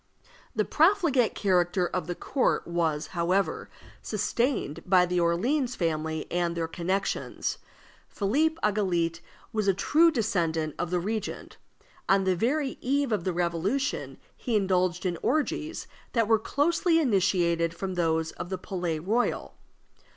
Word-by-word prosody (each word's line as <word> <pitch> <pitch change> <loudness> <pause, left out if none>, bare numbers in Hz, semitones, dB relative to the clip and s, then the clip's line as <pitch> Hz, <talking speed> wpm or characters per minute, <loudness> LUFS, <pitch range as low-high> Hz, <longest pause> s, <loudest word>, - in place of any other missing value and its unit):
The - - +1
profligate 320 - +3
character 180 -2 +2
of 180 +1 -3
the 175 - -3
court 265 +8 0
was, 165 -3 -1
however, 185 +3 0 0.3
sustained 215 - -1
by 180 -1 +4
the 180 0 0
Orleans 240 - +1
family 160 -2 -2
and 175 -1 0
their 165 -1 -1
connections. 185 +4 -2 0.5
Philippe 290 +11 +1
Egalité 180 -6 +1 0.3
was 215 -2 0
a 195 - +4
true 320 - +4
descendant 170 - 0
of 175 - -1
the 180 0 0
regent. 215 +4 -4 0.5
On 195 0 +4
the 185 -1 +2
very 265 - -1
eve 275 0 0
of 205 -5 -1
the 185 - 0
Revolution 175 - -1 0.2
he 240 -4 -2
indulged 185 -2 +1
in 175 -2 -1
orgies 310 +1 -1 0.3
that 230 -3 +2
were 225 -1 +4
closely 330 - +2
imitated 175 - +2
from 190 +2 -4
those 160 -2 0
of 175 - -7
the 190 - -2
Palais 180 -3 -3
Royal. 215 +10 -1
190 Hz, 135 wpm, -27 LUFS, 170-240 Hz, 0.5 s, by